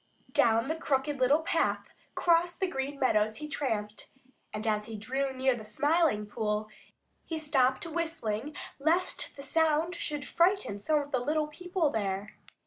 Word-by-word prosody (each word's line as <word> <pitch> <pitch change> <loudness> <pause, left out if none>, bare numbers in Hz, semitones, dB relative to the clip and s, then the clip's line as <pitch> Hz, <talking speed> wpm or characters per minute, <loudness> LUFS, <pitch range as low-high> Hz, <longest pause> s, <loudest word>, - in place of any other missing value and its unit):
Down 230 +2 +3
the 315 - 0
Crooked 285 -2 -1
Little 275 +5 +4
Path 320 - 0 0.2
cross 345 0 +3
the 385 - 0
Green 280 -5 -3
Meadows 215 -4 +2
he 300 +4 -6
tramped, 220 -9 -3 0.4
and 215 +1 -5
as 210 -1 +1
he 225 -1 -6
drew 265 +6 -1
near 260 0 +1
the 220 - -8
Smiling 290 -2 +2
Pool, 210 0 -2 0.6
he 325 - -4
stopped 270 -3 +2
whistling 310 -6 -3 0.2
lest 335 +6 +1
the 275 - -7
sound 320 +3 +2
should 295 -4 -4
frighten 345 - +2
some 300 +9 +2
of 285 0 -8
the 260 - +2
little 300 +5 0
people 350 0 -1
there. 200 -1 -2
275 Hz, 155 wpm, -30 LUFS, 220-320 Hz, 0.6 s, Little